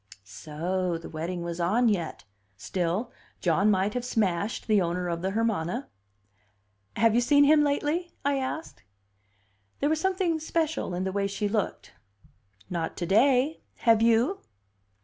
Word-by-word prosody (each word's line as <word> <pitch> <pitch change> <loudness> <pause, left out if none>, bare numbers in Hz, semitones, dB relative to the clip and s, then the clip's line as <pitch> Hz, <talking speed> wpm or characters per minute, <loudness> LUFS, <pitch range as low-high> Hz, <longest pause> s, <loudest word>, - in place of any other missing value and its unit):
So 170 - -3
the 165 - -10
wedding 170 +2 -4
was 170 0 -5
on 215 +8 +2
yet. 180 -7 -1 0.3
Still, 180 - -2 0.3
John 190 +4 +2
might 200 +1 +2
have 250 - -2
smashed 205 -4 -1
the 210 -3 +3
owner 180 +1 -1
of 170 -1 -2
the 190 - -1
Hermana. 225 +1 -1 1.1
"Have 225 +1 +3
you 240 - +3
seen 285 +4 +5
him 295 +1 +5
lately?" 295 +4 0
I 280 -1 +2
asked. 270 +5 -5 1.0
There 290 - +1
was 315 0 0
something 370 -3 0
special 320 - -1
in 180 - -2
the 190 - -2
way 200 +1 0
she 200 +1 -2
looked. 210 -1 -3 0.7
"Not 165 -2 -3
to 175 - -2
day. 255 - +3 0.2
Have 225 -2 +4
you?" 235 - +3
210 Hz, 150 wpm, -27 LUFS, 180-275 Hz, 1.1 s, seen